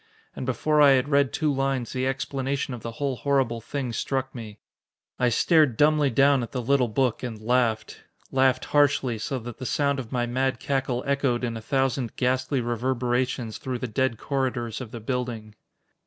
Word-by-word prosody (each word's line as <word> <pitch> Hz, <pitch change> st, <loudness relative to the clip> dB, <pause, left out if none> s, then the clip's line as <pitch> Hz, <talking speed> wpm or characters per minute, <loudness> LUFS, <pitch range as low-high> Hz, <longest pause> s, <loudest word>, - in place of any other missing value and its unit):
And 130 Hz, -, -5 dB
before 150 Hz, +5 st, +2 dB
I 140 Hz, -2 st, +8 dB
had 135 Hz, +2 st, +1 dB
read 140 Hz, -2 st, +3 dB
two 150 Hz, -2 st, 0 dB
lines, 135 Hz, -2 st, -1 dB
the 130 Hz, 0 st, -1 dB
explanation 135 Hz, 0 st, -2 dB
of 120 Hz, -, -7 dB
the 115 Hz, +1 st, -6 dB
whole 135 Hz, +1 st, -2 dB
horrible 130 Hz, -2 st, 0 dB
thing 130 Hz, 0 st, -4 dB
struck 130 Hz, +2 st, -2 dB
me. 110 Hz, -4 st, -8 dB, 0.6 s
I 125 Hz, -, +3 dB
stared 150 Hz, 0 st, +3 dB
dumbly 150 Hz, -1 st, +4 dB
down 135 Hz, +2 st, +4 dB
at 120 Hz, -, -6 dB
the 125 Hz, -, -2 dB
little 135 Hz, 0 st, +2 dB
book 120 Hz, +1 st, 0 dB
and 115 Hz, -4 st, -5 dB
laughed. 115 Hz, -1 st, 0 dB, 0.3 s
Laughed 130 Hz, -1 st, +2 dB
harshly, 140 Hz, -5 st, +2 dB
so 135 Hz, +5 st, -3 dB
that 120 Hz, -1 st, -8 dB
the 130 Hz, -, -5 dB
sound 140 Hz, -1 st, +1 dB
of 120 Hz, -4 st, -7 dB
my 120 Hz, -2 st, 0 dB
mad 130 Hz, 0 st, -1 dB
cackle 135 Hz, -3 st, -1 dB
echoed 140 Hz, -3 st, 0 dB
in 115 Hz, -2 st, -2 dB
a 115 Hz, -, -6 dB
thousand 135 Hz, -1 st, -1 dB
ghastly 130 Hz, +1 st, 0 dB
reverberations 120 Hz, 0 st, -1 dB
through 130 Hz, -2 st, -3 dB
the 125 Hz, -, -4 dB
dead 115 Hz, +1 st, 0 dB
corridors 125 Hz, -3 st, -2 dB
of 125 Hz, -, -7 dB
the 115 Hz, -, -7 dB
building. 115 Hz, -2 st, -4 dB
130 Hz, 185 wpm, -25 LUFS, 120-135 Hz, 0.6 s, I